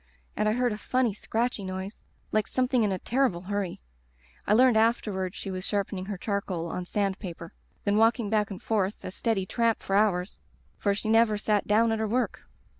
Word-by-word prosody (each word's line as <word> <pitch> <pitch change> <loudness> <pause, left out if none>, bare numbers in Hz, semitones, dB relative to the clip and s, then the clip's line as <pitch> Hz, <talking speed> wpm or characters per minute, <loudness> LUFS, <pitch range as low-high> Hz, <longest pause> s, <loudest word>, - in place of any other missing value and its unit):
And 215 0 +1
I - - +2
heard 245 0 +1
a 210 - -6
funny 250 -3 +1
scratchy 225 +1 -2
noise 190 +2 -5 0.3
like 215 -1 +1
something 255 -1 +1
in 210 -2 +2
a 190 - 0
terrible 240 -4 0
hurry. 195 -1 -3 0.7
(I - - +4
learned 250 0 +6
afterward 210 -4 +1
she 195 - -5
was 185 0 -4
sharp 200 -1 -1
ening 190 -1 -5
her 200 -2 -4
charcoal 185 -4 -2
on 180 -1 -4
sand 200 -1 -1
paper.) 170 -3 -8 0.3
Then 205 0 +2
walking 225 0 +3
back 210 -1 +1
and 195 - -6
forth; 205 -2 -1
a - - -4
steady 205 -1 0
tramp 230 +3 0
for 195 - -1
hours, 200 -3 +1 0.4
for 200 -1 +1
she 210 - -4
never 225 -1 +4
sat 210 -1 0
down 225 +2 +4
at 225 - 0
her 220 - 0
work. 245 +4 -1
210 Hz, 200 wpm, -27 LUFS, 190-225 Hz, 0.7 s, learned